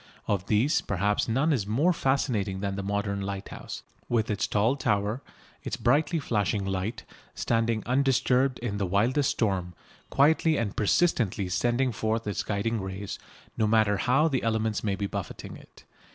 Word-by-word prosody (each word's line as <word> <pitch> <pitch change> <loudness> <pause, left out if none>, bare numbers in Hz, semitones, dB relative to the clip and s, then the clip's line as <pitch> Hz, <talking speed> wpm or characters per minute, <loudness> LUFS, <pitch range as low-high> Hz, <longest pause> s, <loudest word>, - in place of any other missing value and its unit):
Of 100 -2 -1
these 120 +9 +2
perhaps 105 +1 0
none 140 +7 +2
is 105 -8 -1
more 145 +12 +2
fascinating 115 - 0
than 100 0 -2
the 100 - -3
modern 100 0 -2
lighthouse, 100 0 -6 0.3
with 115 -2 +1
its 105 - 0
tall 110 +6 +2
tower, 105 -2 0 0.4
its - - -4
brightly 150 +7 +2
flashing 105 - 0
light, 95 +4 -3 0.3
standing 115 -2 0
undisturbed 130 0 +2
in 100 -4 -2
the 100 - 0
wildest 120 +9 +2
storm, 95 -5 -1 0.3
quietly 155 +2 +3
and 110 -4 -2
persistently 105 - +1
sending 120 +7 +1
forth 110 +1 -1
its 105 -2 -2
guiding 110 +2 -1
rays, 95 +1 -5 0.4
no 110 - +3
matter 110 -2 +3
how 135 +8 +3
the 135 -5 0
elements 110 -1 0
may 100 -3 0
be 100 - -3
buffeting - - -6
it. - - -16
110 Hz, 155 wpm, -27 LUFS, 100-125 Hz, 0.4 s, quietly